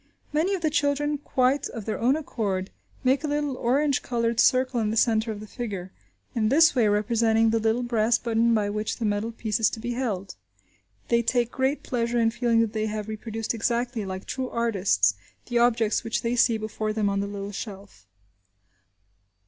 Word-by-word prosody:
Many 340 +6 +1
of 370 - -5
the 310 -2 +1
children, 290 0 0
quite 265 0 +1
of 225 -4 -7
their 220 - -3
own 255 +4 +3
accord, 205 -10 -3 0.3
make 265 +2 +2
a - - -1
little 290 -2 -1
orange 275 +3 +1
coloured 235 -1 -1
circle 255 -1 +3
in 215 -2 0
the 220 - -1
centre 220 0 +2
of 210 - -6
the 215 - -8
figure, 200 -5 -6 0.4
in 220 -3 +1
this 320 +5 +6
way 240 -5 +3
representing 225 +2 +2
the 225 - +2
little 225 +2 +1
brass 230 -1 +2
button 230 0 +1
by 210 -2 +1
which 210 +1 -3
the 230 - -2
metal 210 +2 -1
piece 220 -2 -2
is 220 - +4
to 225 - -7
be 240 +2 -4
held. 210 -7 -3 0.8
They 235 0 +3
take 240 0 0
great 265 +2 -1
pleasure 235 -1 -1
in 225 -1 +3
feeling 235 -1 +2
that 225 -1 -1
they 215 0 -1
have 215 -1 -4
reproduced 220 +1 -4
exactly, 235 0 -1
like 190 0 -6
true 260 -1 -3
artists, 195 - +2 0.3
the 240 -1 0
objects 230 -2 +2
which 230 - -2
they 235 +1 0
see 235 -1 +3
before 215 0 -3
them 215 -1 0
on 200 0 0
the 200 - -2
little 200 0 -6
shelf. 195 - -9
230 Hz, 195 wpm, -25 LUFS, 215-250 Hz, 0.8 s, this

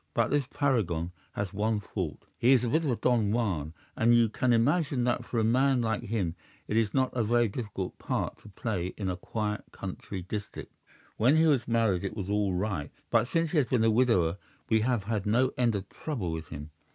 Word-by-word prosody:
"'But - - +2
this 145 -3 +1
paragon 105 - 0 0.2
has 100 -2 -3
one 105 +2 0
fault. 95 -6 -5
He 125 +3 +5
is 125 -2 +4
a 120 - 0
bit 160 +7 +2
of 150 - 0
a 125 - +2
Don 115 -3 +2
Juan, 90 -10 -1 0.2
and 115 +1 +4
you 115 -1 +4
can 125 +3 +1
imagine 140 +3 +2
that 120 0 0
for 120 - -4
a 110 - +3
man 130 +2 +3
like 110 0 0
him 105 -7 -2 0.3
it 105 - -2
is 110 -3 +2
not 130 +1 +1
a 120 - +2
very 120 +2 +3
difficult 100 -4 -5
part - - -2
to 105 - -14
play 95 -3 -3
in 95 -3 -1
a - - -3
quiet 105 +3 -3
country 95 0 -6
district. 100 +3 -6 0.4
When 125 +7 +4
he 160 - +5
was 140 -7 +2
married 115 -6 +2
it 100 +3 -4
was 100 -1 -3
all 100 -3 +1
right, 90 -7 -2 0.2
but - - +3
since 165 +2 0
he 175 - 0
has 135 - +1
been 115 -1 +2
a 115 - +4
widower 100 -7 +2 0.3
we 110 - +4
have 120 -2 +1
had 105 -1 -2
no 125 +5 +3
end 120 -3 +2
of 100 0 -4
trouble 115 - -4
with 80 -1 -5
him. 75 0 -8
110 Hz, 220 wpm, -29 LUFS, 95-125 Hz, 0.4 s, He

